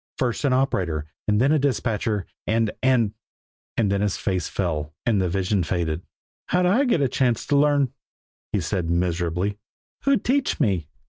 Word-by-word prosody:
First 125 +2 -1
an 140 - +3
operator, 95 - 0 0.2
and 105 0 +3
then 135 +4 +4
a 155 - +4
dispatcher, 110 -7 0 0.2
and 110 0 +2
and 125 -5 +3 0.6
and 105 -4 +2
then 100 0 +1
his 105 -2 0
face 95 -4 -1
fell, 75 -5 -2
and 110 -5 +2
the 90 - 0
vision 95 +2 +1
faded. 85 -1 -1 0.5
"How'd 180 0 +2
I 220 +11 +4
get 230 - +2
a 135 - +3
chance 125 -2 +1
to 145 - +1
learn?" 140 -2 +3 0.6
he - - 0
said 90 -4 -2
miserably. 90 +3 0 0.5
"Who'd 275 -2 +2
teach 275 +2 +1
me?" 95 - +1
105 Hz, 170 wpm, -24 LUFS, 90-135 Hz, 0.6 s, then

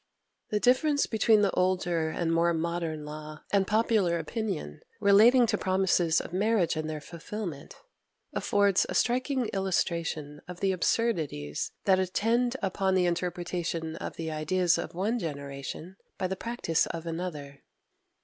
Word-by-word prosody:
The 210 - 0
difference 285 +5 +3
between 220 -1 +3
the 195 - +3
older 175 -3 +1
and 165 0 -1
more 170 0 +3
modern 165 -2 -2
law, 155 +1 -8
and 195 -1 +3
popular 210 -5 +2
opinion, 165 - -4 0.2
relating 220 +5 +6
to - - 0
promises 185 -4 +2
of - - -8
marriage 195 -3 +2
and 155 0 -3
their 155 -1 -4
fulfilment, 170 +1 -7 0.6
affords 200 -2 +2
a - - -3
striking 255 +1 +1
illustration 170 -6 -2
of 180 -1 -8
the 195 -1 +2
absurdities 165 - -1
that 190 -1 +4
attend 230 +7 +1
upon 190 0 +1
the 180 -1 +3
interpretation 175 -2 -2
of - - -6
the 160 -1 -4
ideas 170 +3 +1
of - - -6
one 215 +7 0
generation 140 - -6 0.2
by 190 - -2
the 190 +1 -1
practice 210 -7 -1
of 165 0 -6
another. 160 -5 -5
180 Hz, 140 wpm, -28 LUFS, 160-205 Hz, 0.6 s, relating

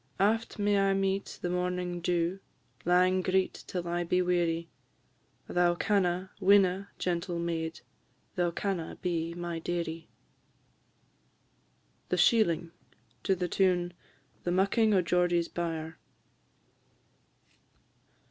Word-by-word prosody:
Aft 225 +4 +1
may 205 -1 +2
I 195 0 +3
meet 195 0 -1
the 175 - 0
morning 180 0 -2
dew, 175 +1 0 0.5
Lang 185 +1 +4
greet 185 +1 0
till 175 -2 -4
I 175 0 -1
be 180 +1 +1
weary; 170 -2 0 0.8
Thou 175 -1 +2
canna, 185 -1 0
winna, 195 0 +4
gentle 175 0 -2
maid! 165 -1 -3 0.5
Thou 175 -1 +1
canna 175 -1 -3
be 170 -2 -1
my 175 -1 -4
dearie. 165 -1 -4 2.0
THE - - +1
SHEELING. 170 -8 +3 0.5
TUNE 190 - +1 1.1
_"The 175 - -1
Mucking 200 +4 +3
o' 185 - +3
Geordie's 175 -1 +2
Byre." 160 -2 -4
180 Hz, 100 wpm, -30 LUFS, 170-190 Hz, 2.0 s, Lang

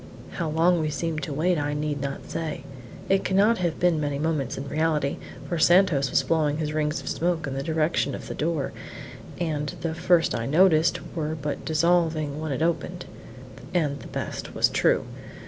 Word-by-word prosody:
How 170 -3 -3
long 165 +3 +3
we 155 -1 0
seemed 155 0 -2
to 155 - -4
wait 165 +4 +1
I 145 0 -1
need 150 -1 -2
not 140 0 -5
say. 160 -2 -4 0.4
It 195 0 +2
cannot 205 +4 +3
have 170 -3 -1
been 175 -3 +3
many 145 -1 -1
moments 150 -4 -1
in 135 - -5
reality, 150 -1 0 0.3
for 170 - -2
Santos 175 -6 +4
was - - +2
blowing 150 -3 +1
his 150 -1 -2
rings 150 0 0
of - - -11
smoke 170 -1 0
in 135 - -4
the 135 - -2
direction 160 +2 0
of - - -8
the - - -4
door, 155 -3 -1 0.7
and 150 -4 -1
the 165 -1 -2
first 170 0 +3
that - - -1
I - - -3
noticed 160 +1 +4 0.2
were 155 -1 -2
but 145 0 -4
dissolving 160 -2 +1
when 155 -2 -3
it 140 +4 -1
opened 170 0 -1 0.7
and 145 -5 +1
the - - -10
best - - -5
was - - +4
true! - - +2
155 Hz, 190 wpm, -25 LUFS, 150-170 Hz, 0.7 s, Santos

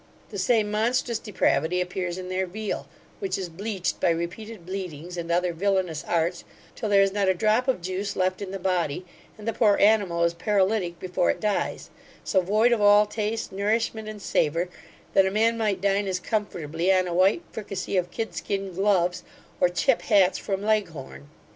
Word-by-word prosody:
The 200 - -5
same 210 +1 +2
monstrous 235 +2 0
depravity 180 -5 +1
appears 180 0 -3
in 185 -1 -6
their 185 0 -1
veal, 210 +3 -4 0.3
which 390 -2 -2
is 185 -2 -4
bleached 190 +1 -3
by - - +2
repeated 170 +4 -4
bleedings, 180 -3 -6
and 170 -1 -4
other 175 0 +1
villainous 185 -3 0
arts, 170 +1 0 0.3
till 220 - -3
there 200 -1 +6
is 195 -1 0
not 200 -1 +1
a 190 - +3
drop 215 +6 +2
of 255 -10 0
juice 185 +3 -3
left 185 +1 0
in 200 - -4
the 195 - -4
body, 180 -3 -1 0.3
and 215 0 -10
the 230 - +1
poor 210 -2 +4
animal 200 -5 +3
is 170 0 +2
paralytic 190 0 0
before 180 0 0
it - - 0
dies; 210 -2 -2 0.3
so 190 - +2
void 215 +6 +3
of 235 -3 +2
all 205 +1 +6
taste, 215 +1 -3
nourishment, 215 +2 -1
and 210 -2 -8
savour, 165 +4 +1 0.4
that 190 -1 +5
a - - +2
man 225 +3 +2
might 210 -5 -1
dine 200 0 +1
as 185 -1 -1
comfortably 180 -4 -1
on 185 -1 +3
a 175 - -3
white 190 - +3
fricassee 200 -3 -4
of 180 -1 +1
kid 225 +4 -4
skin 195 -2 -3
gloves; 180 -2 +1 0.4
or 180 - +4
chip 230 +8 +2
hats 195 -4 +3
from 195 -1 -3
Leghorn. 175 -10 -2
195 Hz, 185 wpm, -25 LUFS, 180-210 Hz, 0.4 s, there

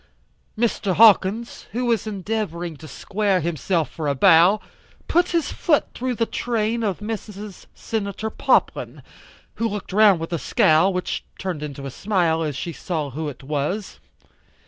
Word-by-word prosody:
Mr. 215 -5 0
Hawkins, 220 +1 +4
who 245 +2 -1
was 230 -2 +1
endeavoring 195 -5 -3
to 155 - -11
square 195 +6 -1
himself 165 0 -1
for 155 -2 -4
a 140 - +1
bow, 170 +9 +6 0.5
put 350 +1 +2
his 335 -3 0
foot 305 -4 +1
through 255 0 -2
the 230 - +1
train 230 -1 -1
of 205 -3 -2
Mrs. 210 -2 -7
Senator 215 0 -4
Poplin, - - 0 0.5
who 230 0 0
looked 205 -2 -6
round 205 -4 +6
with 165 +2 -5
a 170 - -1
scowl, 160 +7 +3
which 180 -1 -3
turned 180 -5 -4
into 140 -2 -6
a 135 - -5
smile 175 -3 0
as 150 -3 -2
she 165 +5 -4
saw 155 -4 -3
who 155 +3 -4
it 140 - -11
was. 150 +9 -3
195 Hz, 155 wpm, -22 LUFS, 160-220 Hz, 0.5 s, bow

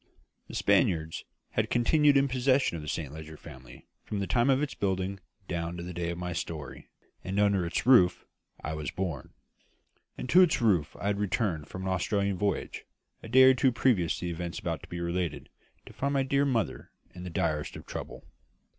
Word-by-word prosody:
"The - - -9
Spaniards" 80 -1 +1 0.3
had - - 0
continued 145 +4 +4
in 140 0 +3
possession 130 -4 +2
of 80 - -5
the 75 - -9
Saint 75 -4 -4
Leger 80 0 -9
family 65 -7 -13 0.2
from 105 - -4
the 100 - -1
time 120 +5 +2
of 135 +2 +3
its 150 - -3
building 95 0 -2 0.3
down 85 0 -3
to 85 - -5
the 90 +1 -6
date 85 0 -2
of 85 - -4
my 90 0 -4
story; 75 -5 -6 0.4
and 95 +2 -2
under 100 -4 +3
its 85 - -2
roof 105 -9 +5 0.4
I 80 - -3
was 75 -1 -4
born. 85 -8 -5 0.8
And - - -5
to 180 - +8
its 175 -4 +4
roof 95 - +2
I - - -6
had 100 0 0
returned 95 -7 -1
from 95 - -7
an 95 - -2
Australian 100 +1 0
voyage, 100 0 -2 0.4
a 115 - -10
day 130 +3 +7
or 130 0 +8
two 130 0 +3
previous 115 -8 +2
to - - -5
the 85 - -2
events 85 0 -5
about 85 -5 -3
to - - -13
be 85 - -5
related, 85 -5 -3 0.4
to - - -12
find 140 +1 -1
my 135 - +3
dear 140 +1 +2
mother 120 -6 -1 0.2
in 90 - -9
the 90 - -5
direst 80 -4 -1
of - - -9
trouble. - - -7
95 Hz, 205 wpm, -29 LUFS, 85-120 Hz, 0.8 s, to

